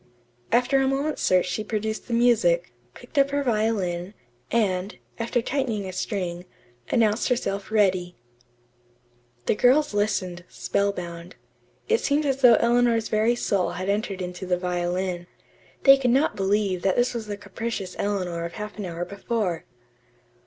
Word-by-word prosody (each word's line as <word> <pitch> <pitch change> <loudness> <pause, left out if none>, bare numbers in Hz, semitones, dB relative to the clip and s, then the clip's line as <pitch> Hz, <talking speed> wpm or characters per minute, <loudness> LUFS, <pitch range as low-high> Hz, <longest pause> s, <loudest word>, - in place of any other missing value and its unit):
After 250 +3 +3
a 265 - +2
moment's 280 +3 -1
search 185 -1 +3
she 185 +4 -2
produced 215 0 -3
the 240 - -3
music, 175 - +3 0.2
picked 260 +4 -4
up 275 0 +4
her 285 0 0
violin, 210 -6 -1 0.3
and, 195 -4 0 0.2
after 230 +1 0
tightening 240 -8 -1
a 185 - -6
string, 180 -3 -3 0.4
announced 220 0 +2
herself 200 -5 -1
ready. 185 -4 +2 1.3
The - - +3
girls 255 +5 +3
listened, 200 -4 -1
spellbound. 180 -3 -3 0.5
It 455 +1 +2
seemed 290 +2 +1
as 270 -1 0
though 245 -3 +8
Eleanor's 235 -1 +2
very 220 +3 +2
soul 195 -6 0
had 185 +2 -4
entered 200 -2 -1
into 180 +1 -6
the 180 -1 +1
violin. 180 0 -2 0.6
They 275 -1 +8
could 260 -2 0
not 270 +6 +2
believe 195 -2 0
that 190 0 +1
this 245 +1 +2
was 230 -3 -5
the 205 -1 -4
capricious 200 -1 -5
Eleanor 180 -4 -1
of 170 0 -5
half 210 0 -7
an 205 - -3
hour 175 0 -4
before. 200 -2 -2
205 Hz, 150 wpm, -25 LUFS, 180-235 Hz, 1.3 s, though